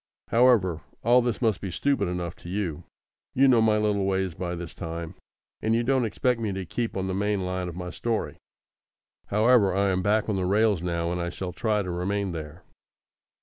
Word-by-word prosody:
However, 115 Hz, -9 st, +4 dB, 0.2 s
all 120 Hz, +2 st, +5 dB
this 120 Hz, 0 st, -2 dB
must 110 Hz, -5 st, +1 dB
be 95 Hz, -, -4 dB
stupid 120 Hz, +2 st, 0 dB
enough 90 Hz, -1 st, -3 dB
to 85 Hz, -, -11 dB
you. 90 Hz, -4 st, -3 dB, 0.5 s
You 135 Hz, +2 st, +5 dB
know 120 Hz, -3 st, +5 dB
my 110 Hz, -1 st, +3 dB
little 105 Hz, -2 st, +1 dB
ways 95 Hz, -2 st, 0 dB
by 90 Hz, +1 st, -4 dB
this 85 Hz, 0 st, -7 dB
time, 85 Hz, -1 st, -6 dB, 0.5 s
and 110 Hz, +1 st, +1 dB
you 120 Hz, -, +1 dB
don't 130 Hz, 0 st, +2 dB
expect 120 Hz, +2 st, 0 dB
me 110 Hz, -3 st, -1 dB
to 95 Hz, -1 st, -4 dB
keep 115 Hz, +4 st, -3 dB
on 95 Hz, -, -1 dB
the 95 Hz, -, -2 dB
main 100 Hz, 0 st, 0 dB
line 90 Hz, 0 st, -2 dB
of 85 Hz, -, -8 dB
my 90 Hz, 0 st, -5 dB
story. 115 Hz, -2 st, -2 dB, 0.9 s
However, 105 Hz, -2 st, +4 dB
I 100 Hz, 0 st, +2 dB
am 95 Hz, 0 st, 0 dB
back 105 Hz, +2 st, +1 dB
on 105 Hz, -3 st, 0 dB
the 95 Hz, -, 0 dB
rails 105 Hz, -1 st, +2 dB
now, 85 Hz, -1 st, -1 dB
and 90 Hz, 0 st, -2 dB
I 85 Hz, -, -2 dB
shall 90 Hz, 0 st, -5 dB
try 105 Hz, -3 st, 0 dB
to 90 Hz, -, -4 dB
remain 95 Hz, +2 st, -1 dB
there. 80 Hz, +1 st, -7 dB
95 Hz, 205 wpm, -26 LUFS, 90-110 Hz, 0.9 s, all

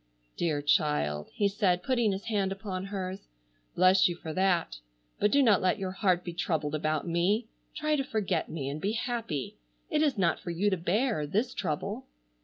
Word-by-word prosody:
"Dear 155 Hz, -4 st, -1 dB
child!" 75 Hz, -, +1 dB
he 205 Hz, -, +1 dB
said, 195 Hz, -3 st, +1 dB
putting 240 Hz, -5 st, +2 dB
his 195 Hz, +1 st, -4 dB
hand 205 Hz, -4 st, 0 dB
upon 195 Hz, -2 st, -4 dB
hers. 190 Hz, -1 st, -5 dB, 0.5 s
"Bless 185 Hz, +1 st, +5 dB
you 175 Hz, -, -3 dB
for 160 Hz, -2 st, -7 dB
that. 180 Hz, -, +1 dB, 0.4 s
But 210 Hz, -, +3 dB
do 280 Hz, +5 st, +4 dB
not 215 Hz, -6 st, +5 dB
let 185 Hz, +2 st, +2 dB
your 190 Hz, -2 st, -3 dB
heart 185 Hz, -2 st, +1 dB
be 175 Hz, -, -5 dB
troubled 155 Hz, -3 st, -1 dB
about 155 Hz, +1 st, -1 dB
me. 180 Hz, +7 st, +1 dB, 0.3 s
Try 305 Hz, 0 st, +1 dB
to 275 Hz, -, 0 dB
forget 200 Hz, -9 st, -1 dB
me 145 Hz, -4 st, -4 dB
and 145 Hz, +2 st, -4 dB
be 205 Hz, +4 st, 0 dB
happy. 230 Hz, -, -3 dB, 0.3 s
It 305 Hz, -, +2 dB
is 290 Hz, -6 st, +2 dB
not 170 Hz, -4 st, +2 dB
for 175 Hz, -, -7 dB
you 190 Hz, +5 st, +1 dB
to 190 Hz, -, +1 dB
bear, 185 Hz, -, 0 dB
this 225 Hz, -, 0 dB
trouble." 155 Hz, -6 st, -3 dB
185 Hz, 190 wpm, -29 LUFS, 165-210 Hz, 0.5 s, Bless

